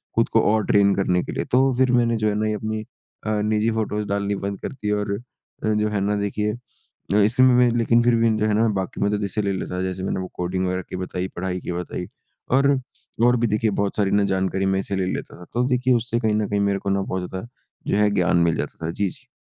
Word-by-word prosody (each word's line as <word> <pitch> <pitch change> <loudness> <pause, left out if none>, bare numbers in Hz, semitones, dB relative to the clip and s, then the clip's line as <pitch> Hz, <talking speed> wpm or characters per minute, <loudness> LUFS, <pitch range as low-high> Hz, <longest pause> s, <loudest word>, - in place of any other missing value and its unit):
खुद - - +2
को - - +3
और 110 -2 +1
ट्रेन 100 -1 +4
करने 90 -2 +1
के - - -6
लिए। - - -3
तो 130 +1 +4
फ़िर 130 -1 +3
मैंने 120 -2 +3
जो 110 -1 0
है 105 - -1
ना 110 - +1
ये 110 - 0
अपनी 110 +1 -3 0.5
अ, 105 -1 +1
निजी 105 +1 +1
फ़ोटोस 105 -1 -2
डालनी 100 0 -1
बंद 100 -1 -4
कर - - -4
दी 105 -6 -3
और 100 -1 -2 0.5
जो 105 0 +1
है 105 -1 -1
ना 105 +1 +1
देखिए 105 +1 -1 0.7
इसी 120 +4 +3
में 130 -1 +6
में 125 -1 +5
लेकिन 115 0 +3
फ़िर 120 0 +4
भी 115 0 +3
जो 110 - +1
है 105 - +1
ना 110 +2 +3
बाकी 95 -1 -4
मतलब 105 +1 +1
जैसे 100 +1 -1
ले 100 -1 0
लेता 95 -1 -4
था - - -1
जैसे 95 0 -3
मैंने 95 - -1
वो 95 - -4
कोडिंग 90 +1 -1
वगैरा 90 0 -1
की - - -5
बताई 90 0 -3
पढ़ाई 90 0 -2
की - - -5
बताई, 90 0 -4 0.4
और 135 +2 +4 0.6
और 120 0 +4
भी 120 0 +1
देखिए 110 +1 +1
बहुत 100 - -1
सारी 100 -2 +1
ना 100 0 +3
जानकारी 95 0 0
मैं 95 0 +1
इससे 100 0 -3
ले 95 -1 0
लेता - - -6
था। 90 - -11
तो 120 - +1
देखिए 125 0 +2
उससे 120 0 0
कहीं 110 -2 +1
न 105 -1 0
कहीं 100 - 0
मेरे 100 -1 +1
को 100 - -3
ना 100 0 +1
बहुत 95 -2 -3
ज़्यादा 95 +5 -6 0.4
जो - - +1
है 105 0 +4
ज्ञान 90 -3 +2
मिल 80 - +2
जाता 80 - -5
था। 80 - -1
जी, 100 +3 -1
जी। - - -15
105 Hz, 260 wpm, -23 LUFS, 95-110 Hz, 0.7 s, में